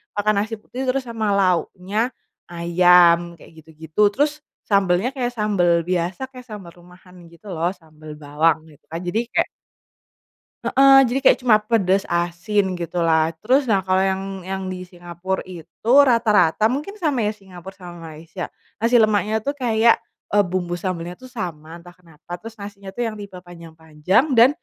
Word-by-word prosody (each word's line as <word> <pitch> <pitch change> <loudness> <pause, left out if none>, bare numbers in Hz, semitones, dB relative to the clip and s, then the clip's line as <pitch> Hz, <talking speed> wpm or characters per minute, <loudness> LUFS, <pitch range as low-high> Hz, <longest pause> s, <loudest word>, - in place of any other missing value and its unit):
makan 210 +1 +1
nasi 215 +2 -1
putih 255 - -8
terus 265 +1 +1
sama 225 -2 -3
lauknya, 185 +1 -1 0.6
ayam 175 0 +5 0.2
kayak - - -17
gitu-gitu 160 +4 -6
terus 290 +2 +2 0.4
sambelnya 195 +3 +2
kayak 245 -2 -2
sambel 205 -5 +1 0.2
biasa 180 +8 -2
kayak 255 -1 -11
sambel 195 -5 -9
rumahan 180 +1 -18 0.2
gitu 170 +5 -20
loh 165 +2 0
sambel 155 -1 -14
bawang 155 +3 +2
gitu 145 - -22
kan 165 - -4
jadi 210 +5 0
kayak. - - +1 1.2
Heeh, 270 0 +6
jadi 260 - 0
kayak - - +6
cuma 225 -4 +5
pedas 200 -3 +1
asin 180 +3 -1
gitulah 165 -2 0
terus 260 +5 +2
nah 200 -5 +2
kalo 185 0 0
yang 190 0 -1 0.2
yang 190 0 -4
di 185 0 -6
Singapura 175 +1 -5
itu 175 -4 -10 0.4
rata-rata 215 -5 +3
mungkin 290 - -3
sama 270 -9 0
ya 210 - -1
Singapura 190 -2 -12
sama 175 -2 -11 0.2
Malaysia, 165 +4 -7 0.3
nasi 230 +1 +3
lemaknya 215 0 +1
tuh 285 +4 -3
kayak, 230 -2 +3 0.3
eee, 205 0 +3
bumbu 175 -1 -3
sambalnya 175 -1 -5
tuh 255 - -14
sama 170 -8 -7
entah 175 0 -16
kenapa 175 0 -11
terus 225 +5 -10
nasinya 200 -1 -9
tuh 245 - -5
yang 215 - -9
tipe 200 -1 -10
panjang-panjang 170 - -2
dan, 240 +3 +8
185 Hz, 160 wpm, -21 LUFS, 175-220 Hz, 1.2 s, dan